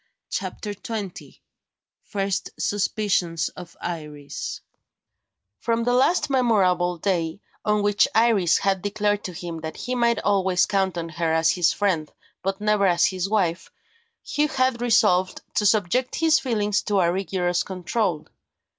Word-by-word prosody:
CHAPTER 210 -1 -4
XX 205 -2 -7 0.6
FIRST 195 -1 -2
SUSPICIONS 195 -5 0
OF 175 -2 -12
IRIS 150 -4 -6 1.0
FROM 230 0 0
the 245 +1 +1
last 265 +8 +3
memorable 190 -10 +2
day, 170 -1 -1 0.2
on 210 -1 +1
which 205 0 +3
Iris 220 -6 +4
had 195 -1 0
declared 205 0 0
to 185 - -4
him 170 -2 -6
that 160 0 -6
he 250 - -4
might 235 -2 +2
always 190 -3 +2
count 190 -3 0
on 165 -1 -4
her 165 0 -1
as 160 0 +3
his 170 -3 +2
friend, 165 -3 -1 0.3
but 195 +1 -2
never 210 -1 +2
as 175 -1 +4
his 185 0 -1
wife, 185 -5 0 0.5
Hugh 300 +1 0
had 255 -4 0
resolved 210 -6 +3
to 210 - +2
subject 215 +5 +1
his 320 -1 +4
feelings 210 -8 0
to 205 -2 0
a 170 -2 +3
rigorous 180 -2 0
control. 185 -2 -2
195 Hz, 140 wpm, -24 LUFS, 175-215 Hz, 1.0 s, Iris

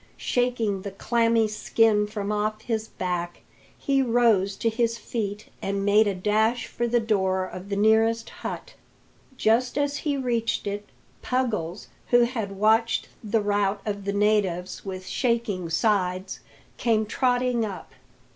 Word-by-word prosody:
Shaking 235 -6 0
the 200 - -5
clammy 230 +2 +2
skin 215 0 +2
from 210 -1 -4
off 215 +1 -1
his 220 -2 -2
back, 175 -3 -4 0.4
he 275 -1 +1
rose 230 -6 +3
to 230 - -2
his 230 0 +1
feet 210 -3 -4
and 195 0 -2
made 210 +1 +5
a 200 - 0
dash 220 +5 +1
for 240 - -2
the 240 +1 +2
door 190 -4 +1
of 185 +1 -9
the 200 - -1
nearest 220 +2 +3
hut. - - -6 0.6
Just 245 +4 +2
as 285 0 0
he 290 -3 -1
reached 235 -4 -1
it, 205 0 -4 0.3
Puggles, 215 -9 -2 0.2
who 245 0 +5
had 230 -5 -1
watched 220 +3 +2
the 215 +1 +1
rout 205 -1 +1
of 200 -2 -4
the 200 - -1
natives 200 -4 0
with 185 -1 -6
shaking 230 -7 -1
sides, 185 0 0 0.4
came 220 -2 +2
trotting 245 0 +1
up. 200 -4 -6
215 Hz, 145 wpm, -25 LUFS, 200-235 Hz, 0.6 s, made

